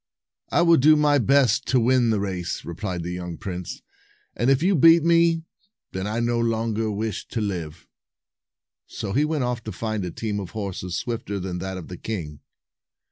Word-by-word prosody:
"I 175 - +3
will 170 -1 +6
do 155 +3 +6
my 150 -1 +3
best 130 -1 +3
to 130 - +3
win 120 0 +3
the 110 -2 +1
race," 95 -4 -3
replied 90 0 -4
the 90 - -4
young 90 -2 -5
prince; 90 -2 -6 0.5
"and 120 - +1
if 135 +3 +3
you 195 +2 +3
beat 165 0 +6
me, 170 -1 +3 0.5
then 95 +1 -3
I 110 +2 -2
no 120 0 0
longer 115 -1 0
wish 105 0 -3
to 115 - -4
live." 85 -6 -4 1.0
So 95 - -5
he 145 +4 +3
went 150 -3 -1
off 125 -1 -2
to 110 - -4
find 110 -3 -3
a 90 - -3
team 105 +3 -3
of 95 -1 -7
horses 95 -3 -4
swifter 115 -4 -3
than 90 -1 -4
that 95 +1 -4
of 90 - -8
the 90 - -8
king. 80 -10 -5
110 Hz, 190 wpm, -24 LUFS, 95-130 Hz, 1.0 s, will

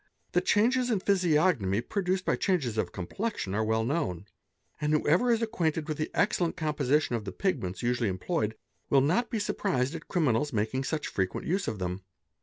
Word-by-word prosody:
The - - +3
changes 245 +4 +2
in 220 -5 +2
physiognomy 160 - +2
produced 185 - -1
by - - +2
changes 150 - 0
of 100 -6 -1
complexion 95 - -3
are 110 +2 +1
_ - - -4
well 110 0 +2
known; 105 - -1 0.6
and 150 0 +1
whoever 165 +10 +3
is 230 0 +2
acquainted 165 -9 -1
with 155 -1 -3
the 155 - -1
excellent 180 -5 +1
composition 150 -4 +1
of 115 - -3
the 100 - -5
pigments 95 - -2
usually 120 -2 +1
employed, 110 - -1 0.3
will 135 - +5
not 180 - +2
be 235 - -2
surprised 135 -9 0
at 165 -2 -7
criminals 150 -5 +1
making 110 +5 -1
such 155 +1 -2
frequent 95 -1 -2
use 190 +3 0
of 110 - -2
them. 90 0 -3
150 Hz, 185 wpm, -29 LUFS, 110-185 Hz, 0.6 s, will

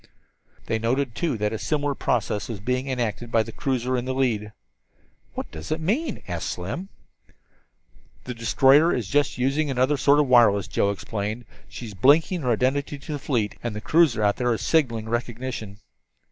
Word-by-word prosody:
They 110 - -1
noted, 125 +3 0
too, 150 -2 -1
that 105 +1 -1
a 110 - -3
similar 145 -2 -1
process 110 -5 -1
was 110 -4 -5
being 125 +5 -2
enacted 120 -2 -3
by 115 -1 +3
the - - -9
cruiser 130 -1 -1
in 125 0 -2
the 130 0 -2
lead. 110 -6 0 0.8
"What - - -5
does 80 0 -8
it 155 - 0
mean?" 225 - -1
asked 85 -1 -3
Slim. 95 - -5 1.3
"The 125 - -5
destroyer 135 +7 +4
is 115 -6 -2
just 145 +3 +1
using 135 +4 0
another 130 +2 +1
sort 145 +2 +4
of 150 - +3
wireless," 115 -6 +5
Joe 100 - +1
explained. 105 +3 -4 0.2
"She 125 - -8
is 105 - -8
blinking 150 - +3
her 125 - -1
identity 135 +5 0
to 140 +3 -9
the 145 - -3
fleet, 120 -7 -2
and 120 -3 -4
the - - -3
cruiser 140 -3 +3
out 100 0 +2
there 125 -1 +1
is - - -6
signaling 115 -9 +1
recognition." 120 -3 -4
125 Hz, 180 wpm, -24 LUFS, 110-140 Hz, 1.3 s, wireless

